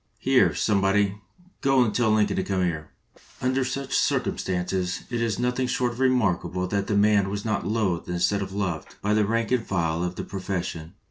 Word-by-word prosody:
"Here, - - +3
somebody, 100 0 +1 0.4
go 135 -2 +4
and 110 - -1
tell 120 -3 +2
Lincoln 105 -1 +2
to 95 - +1
come 95 -2 0
here." 80 -3 -2 0.5
Under 130 +1 +1
such 135 +1 -4
circumstances 90 0 0
it 120 -1 -1
is 115 -3 0
nothing 125 +1 0
short 125 -1 0
of 120 - -10
remarkable 95 -9 +1
that 100 0 -1
the 105 - +1
man 100 -1 +4
was 100 +1 -4
not 110 -5 -1
loathed 100 -7 -1
instead 90 +3 +1
of 95 - -4
loved 95 -5 -3
by 105 +1 +2
the 105 -1 +2
rank 115 +1 0
and 125 -3 +2
file 85 -4 -1
of 90 0 -3
the - - -4
pro 95 - -6
fession. 90 -4 -4
100 Hz, 195 wpm, -25 LUFS, 90-115 Hz, 0.5 s, go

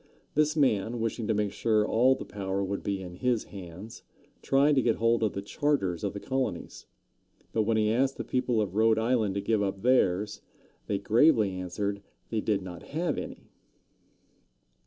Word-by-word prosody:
This 150 +1 +2
man, 120 -5 +1
wishing 115 0 -2
to 110 - +2
make 105 -1 0
sure 110 0 +1
all 125 +5 +4
the - - -7
power 100 -1 -3
would 100 +1 -3
be 100 -1 -3
in 90 -1 -9
his 125 -1 +1
hands, 95 +2 -10 0.4
tried 140 +2 +3
to 135 - +3
get 115 -2 +2
hold 115 0 +2
of 110 -2 +1
the 100 - -4
charters 100 - -1
of 100 - -1
the 100 - -5
colonies. 130 +4 -3 0.7
But 110 -2 +1
when 115 -1 +2
he 105 0 +2
asked 130 +4 +1
the - - -3
people 125 -3 0
of 95 -3 -6
Rhode 110 +1 +3
Island 110 -3 +1
to 100 - -1
give 105 +1 +1
up 95 0 -2
theirs, 105 -5 +2 0.5
they 100 - 0
gravely 110 +1 +4
answered 100 +2 -3 0.3
they 110 -2 0
did 105 -3 0
not 90 -2 -8
have 165 +4 -2
any. - - -9
110 Hz, 180 wpm, -28 LUFS, 100-120 Hz, 0.7 s, all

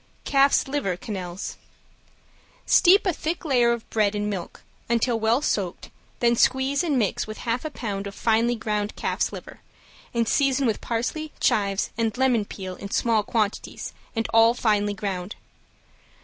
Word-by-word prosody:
~CALF'S 275 0 +3
LIVER 270 -11 -1
QUENELLES~ 185 -2 -6 1.1
Steep 390 +2 +5
a 370 - +2
thick 330 +3 -4
layer 245 -5 +3
of 235 -1 -3
bread 210 -2 +2
in 210 0 -1
milk, 195 -4 -5 0.3
until 235 0 +1
well 225 +5 +2
soaked, 190 - -2 0.3
then 235 0 +4
squeeze 265 +5 +2
and 305 -6 +1
mix 215 -3 0
with 215 - -7
half 235 +1 -2
a - - -1
pound 205 -8 -4
of 200 - -8
finely 230 +1 +2
ground 210 -2 -2
calf's - - -1
liver, - - -10 0.5
and 230 -1 0
season 275 0 +2
with 225 -3 0
parsley, 275 +7 -3
chives 200 -1 +1
and 225 0 0
lemon 250 -5 +2
peel 190 -2 -7
in 200 - -7
small 225 +1 +2
quantities, 210 0 -2 0.2
and 225 0 -1
all 225 +1 +6
finely 205 -3 +1
ground. 190 -1 -4
225 Hz, 155 wpm, -24 LUFS, 205-255 Hz, 1.1 s, all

